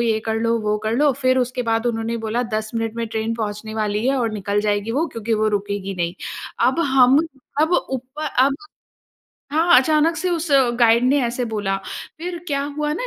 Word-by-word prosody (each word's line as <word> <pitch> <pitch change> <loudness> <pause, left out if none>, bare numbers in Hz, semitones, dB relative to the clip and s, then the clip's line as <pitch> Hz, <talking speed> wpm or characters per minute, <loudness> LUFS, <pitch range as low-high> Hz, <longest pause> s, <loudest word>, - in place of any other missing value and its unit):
ये 225 -2 +2
कर 220 - 0
लो, 230 0 +1
वो 210 0 0
कर 220 - 0
लो 295 +2 +4
फिर 255 0 +3
उसके 250 0 -1
बाद 225 0 0
उन्होंने 230 0 -1
बोला, 235 +3 0
"10 215 -2 -3
मिनट 225 -1 -2
में 230 -1 -2
ट्रेन 220 +1 -2
पहुँचने 215 -1 -4
वाली 215 +1 -1
है 275 - +2
और 235 -4 0
निकल 205 0 -1
जाएगी 205 +1 -1
वो 310 +7 +1
क्योंकि 230 0 -1
वो 215 0 +1
रुकेगी 200 -1 -2
नहीं।" 175 -1 -2 0.5
अब 265 +6 0
हम 260 +1 +6 0.4
अब 320 +3 +2 0.2
ऊप 260 +2 -5 0.2
अब 270 +2 +4 1.0
हाँ, 330 +3 +5
अचानक 305 +5 +3
से 370 - -1
उस 335 -1 -1 0.3
गाइड 235 0 +5
ने 275 +3 +3
ऐसे 245 +1 -2
बोला। 200 -2 -1 0.4
फिर 345 +1 -5
क्या 280 -3 -1
हुआ 300 0 -1
ना - - -3
230 Hz, 200 wpm, -21 LUFS, 215-270 Hz, 1.0 s, हम